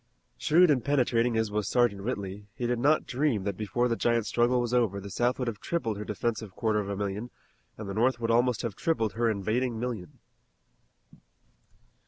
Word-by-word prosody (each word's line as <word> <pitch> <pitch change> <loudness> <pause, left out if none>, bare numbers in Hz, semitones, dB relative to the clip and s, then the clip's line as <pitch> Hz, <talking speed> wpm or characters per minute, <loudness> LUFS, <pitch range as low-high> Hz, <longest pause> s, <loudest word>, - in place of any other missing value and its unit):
Shrewd 175 +1 +4
and 130 -5 +1
penetrating 125 -4 +2
as 110 -2 0
was 105 -2 -1
Sergeant 120 -6 +2
Whitley 100 -3 -4
he 120 - -3
did 120 0 0
not 150 +5 +3
dream 130 -6 0
that 100 -1 -2
before 110 +5 0
the 115 - 0
giant 115 -1 +1
struggle 120 +2 +2
was 120 0 -1
over 115 -5 +2
the 100 0 -8
South 120 +7 +1
would 125 - -2
have 110 -3 -3
tripled 115 -10 -2
her - - -3
defensive 105 -1 -3
quarter 110 -2 +1
of 100 -1 -3
a 100 - -2
million 100 +4 -3 0.5
and 105 - -7
the 100 - -4
North 120 +4 +2
would 115 -1 0
almost 120 +1 +2
have 115 -4 -2
tripled 115 -9 0
her 115 0 +1
invading 110 +3 -1
million. 115 -7 -5
115 Hz, 195 wpm, -28 LUFS, 105-125 Hz, 0.5 s, Shrewd